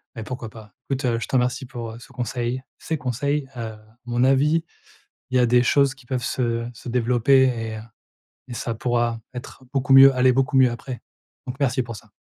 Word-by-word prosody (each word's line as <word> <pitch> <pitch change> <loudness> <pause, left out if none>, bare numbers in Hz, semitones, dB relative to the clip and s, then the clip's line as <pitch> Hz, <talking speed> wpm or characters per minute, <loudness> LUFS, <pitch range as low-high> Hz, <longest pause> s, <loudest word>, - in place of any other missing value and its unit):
Mais 115 - -5
pourquoi 120 -1 -6
pas. 110 -1 -14 0.2
Écoute, 130 -4 0
je - - -5
te - - -2
remercie 125 +1 +1
pour, 120 -3 -7
heu, 115 - -10
ce - - -15
conseil, 125 +1 -3 0.2
ces 160 - -3
conseils, 140 +3 -2
heu, 110 -2 -5 0.3
mon 120 0 0
avis, 150 +5 +3 0.7
il 130 - 0
y - - +5
a 125 - +4
des 120 +1 +4
choses 140 +1 +3
qui 130 -3 -20
peuvent 125 -2 -2
se 115 -2 -1
se 120 - -10
développer 125 +2 +3
et 115 -4 -1
heu - - -6 0.7
et 120 - -6
ça 115 0 -3
pourra 120 0 0
être 130 +1 -9
beaucoup 135 0 +1
mieux 135 0 +9
aller 130 0 +4
beaucoup 135 +2 +1
mieux 130 -2 +6
après. 120 +1 -7 0.5
Donc 125 - -5
merci 130 -1 +1
pour 115 -2 -7
ça. 105 0 -15
125 Hz, 205 wpm, -23 LUFS, 120-135 Hz, 0.7 s, mieux